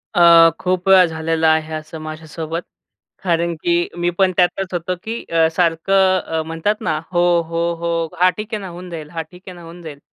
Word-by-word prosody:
अ, 170 -1 +7
खूप 185 0 -1
वेळा 190 -1 +7
झालेलं 160 0 -1
आहे 160 0 +1
असं 155 +1 -7
माझ्यासोबत 160 +1 -6 0.6
कारण 170 -1 0
की 175 0 +1
मी 175 0 +1
पण 190 -1 +3
त्यातच 185 +1 +1
होतो 175 +1 -2
की 225 +1 -5
अ, 165 -1 +3
सारखं 185 +2 +2
अ, 160 -2 -3
म्हणतात 165 +6 -1
ना 160 -8 -1 0.2
हो, 175 - +2 0.3
हो, 170 +1 -1
हो. 170 -1 -1
"हां, 180 +1 +6
ठीक 215 +2 -7
आहे 215 - -2
ना 195 - -7
होऊन 180 +1 -9
जाईल. 160 -3 -7
हां, 165 0 -4
ठीक 180 0 -15
आहे 185 - -8
ना 175 - -12
होऊन 170 +1 -12
जाईल." 155 -4 -9
170 Hz, 200 wpm, -19 LUFS, 160-185 Hz, 0.6 s, अ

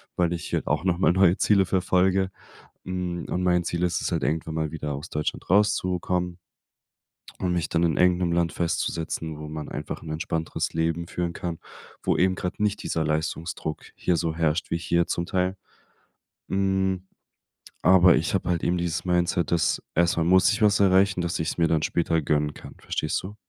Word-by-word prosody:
weil 85 -1 +1
ich 85 - -5
hier - - -1
auch 75 +3 0
nochmal 90 -1 +3
neue 95 -1 +4
Ziele 100 -3 +3
verfolge, 95 +1 +2 0.5
hm, 90 -2 -3
und 90 - -1
mein 90 -1 +2
Ziel 85 +1 -2
ist 85 -3 0
es - - -2
halt - - 0
irgendwann 80 +1 -1
mal 80 -2 -1
wieder 75 -3 -4
aus 75 +5 -7
Deutschland 75 +2 -3
rauszukommen 90 -3 +1 1.0
und 90 -1 0
mich 85 -3 -1
dann 85 0 +1
in 80 -3 +1
irgendeinem 90 -1 +3
Land 85 -1 +1
festzusetzen, 80 -2 -2
wo 75 0 -7
man 75 -1 -6
einfach 75 - -5
'n 80 - -9
entspannteres 80 +1 -3
Leben 85 +1 -1
führen 85 -1 -3
kann, 85 -2 -5 0.4
wo - - +1
eben 95 +1 +3
gerade 90 +4 -3
nicht 105 0 0
dieser 80 - -1
Leistungsdruck 80 0 -3
hier 90 - 0
so 80 -1 -1
herrscht 80 0 0
wie 85 - +1
hier 85 0 +1
zum 85 0 -2
Teil. 95 0 0 0.9
Hm, 95 -1 0 0.7
aber 90 0 +6
ich - - -1
habe 90 - -1
halt 85 -2 0
eben 90 +1 +1
dieses 85 -1 -2
Mindset, 90 -1 +1
dass 85 -2 +1
erstmal 85 -1 +2
muss 95 +1 +5
ich 110 +2 -2
was 105 -1 +4
erreichen, 95 -1 +4
dass 85 -1 -2
ich‘s 80 +2 -2
mir 85 -1 +3
dann 80 -1 +1
später 85 -1 +1
gönnen 75 0 0
kann, - - -12
verstehst 75 - -2
du? 100 +3 -8
85 Hz, 185 wpm, -25 LUFS, 80-90 Hz, 1.0 s, aber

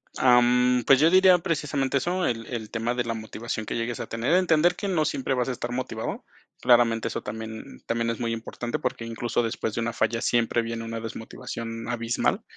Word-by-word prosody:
Am, 125 0 +4
pues, 135 -1 +7
yo 160 +2 +6
diría 185 0 +6
precisamente 150 -5 -1
eso, 180 +5 0
el 115 -2 -1
el 115 -4 -5
tema 115 +1 -1
de 125 - 0
la 115 -1 -2
motivación 110 0 -5
que - - -4
llegues 120 +1 -2
a 120 - -4
tener. 115 +8 -1
Entender 175 -1 +4
que 200 +2 -4
no 165 -5 +1
siempre 135 0 -1
vas 125 0 0
a - - 0
estar 120 -1 -4
motivado. 125 -3 -4 0.4
Claramente 120 -2 +4
eso - - -4
también 110 - -7
también 115 0 -1
es 115 - -3
muy 115 -1 -1
importante, 115 +1 -4
porque 125 -3 -3
incluso 120 +1 -1
después 110 -1 -3
de 115 - -1
una 115 0 -2
falla 115 +1 0
siempre 120 -1 +2
viene 115 0 -4
una 115 0 -4
desmotivación 115 0 -6
abismal. 115 0 0
120 Hz, 200 wpm, -26 LUFS, 115-130 Hz, 0.4 s, pues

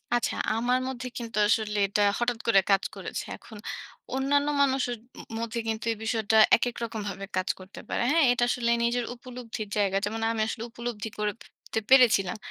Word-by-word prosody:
আচ্ছা, 240 - 0 0.2
আমার 245 +2 +2
মধ্যে 255 -1 -4
কিন্তু 230 -3 -5
আসলে 210 -1 +1
এটা 205 +1 0 0.2
হঠাৎ 240 -1 0
করে 225 -4 +6
কাজ 195 0 +4
করেছে। - - -5
এখন 220 - -13 0.6
অন্যান্য 285 +2 +2
মানুষের 265 -3 +2 0.4
ম - - -5
মধ্যে 230 0 -3
কিন্তু 220 0 -2
এই 225 - -3
বিষয়টা 220 -1 +1 0.2
একেক 240 +1 -1
রকমভাবে 210 -4 -4
কাজ 185 - 0
করতে 185 +1 -11
পারে। - - -1
হ্যাঁ? 325 -2 +5
এটা 245 0 +1
আসলে 235 -1 0
নিজের 240 0 +1
উপলব্ধির 240 -3 -7
জায়গা, 195 -1 +2
যেমন 220 +2 -3
আমি 225 -1 -1
আসলে 225 0 -4
উপলব্ধি 235 -2 -5
করে 210 0 0 0.4
তে 220 - +2
পেরেছিলাম। 230 -9 +5
230 Hz, 175 wpm, -27 LUFS, 215-245 Hz, 0.6 s, করে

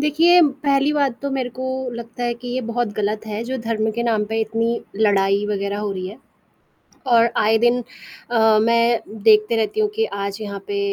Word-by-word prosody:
देखिए, 325 +4 +4
पहली 280 0 +1
बात 280 -5 0
तो 280 - -2
मेरे 265 -2 -2
को 260 - -3 0.3
लगता 235 +1 -8
है 240 0 -1
कि 245 +1 -10
ये 255 - -1
बहुत 235 -2 -1
गलत 210 +1 -2
है, 215 +1 -4
जो 260 +2 -3
धर्म 220 -1 -1
के 235 +2 -3
नाम 225 -3 +1
पे 225 0 0
इतनी 230 +2 -1 0.2
लड़ाई 200 -1 +2
वगैरह 200 0 -2
हो 210 -1 -3
रही 185 -1 -5
है। 200 +4 -9 0.9
और 235 -2 +4
आए 220 +1 +3
दिन 240 +2 +2 0.5
अ, 220 -2 +4
मैं 235 +1 +3 0.2
देखती 215 +1 +4
रहती 225 - -1
हूँ 425 - +2
कि 445 - +2
आज 200 - -5
यहाँ 200 -2 -5
पे 405 0 -3
230 Hz, 200 wpm, -20 LUFS, 215-255 Hz, 0.9 s, देखिए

